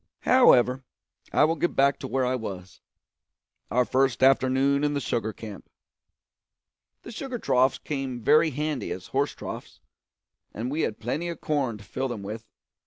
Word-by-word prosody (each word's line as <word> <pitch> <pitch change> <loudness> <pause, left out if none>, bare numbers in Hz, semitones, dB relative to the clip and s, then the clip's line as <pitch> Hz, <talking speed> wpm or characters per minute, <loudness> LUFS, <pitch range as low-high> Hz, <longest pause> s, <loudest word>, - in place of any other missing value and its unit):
However, 130 - +5 0.5
I - - +4
will 160 +2 +3
get 175 - -1
back 140 +1 +3
to 130 - -5
where 130 0 0
I 125 - 0
was 95 -6 -6 0.9
our 125 +1 +2
first 130 0 +1
afternoon 135 +1 +3
in 145 0 +1
the - - 0
sugar 115 -4 -2
camp. 105 -1 -10 1.3
The - - -9
sugar 255 +2 -5
troughs 130 - +2
came 135 -4 -4
very 155 +7 +4
handy 150 0 -3
as - - -5
horse - - 0
troughs, - - -8 0.8
and 120 +5 -3
we 155 +3 -1
had 110 - -2
plenty 150 +9 -3
of 170 - -6
corn 135 -7 -1
to 105 - -14
fill 130 +5 -3
them 115 -5 -6
with. 110 +3 -7
130 Hz, 165 wpm, -26 LUFS, 120-150 Hz, 1.3 s, However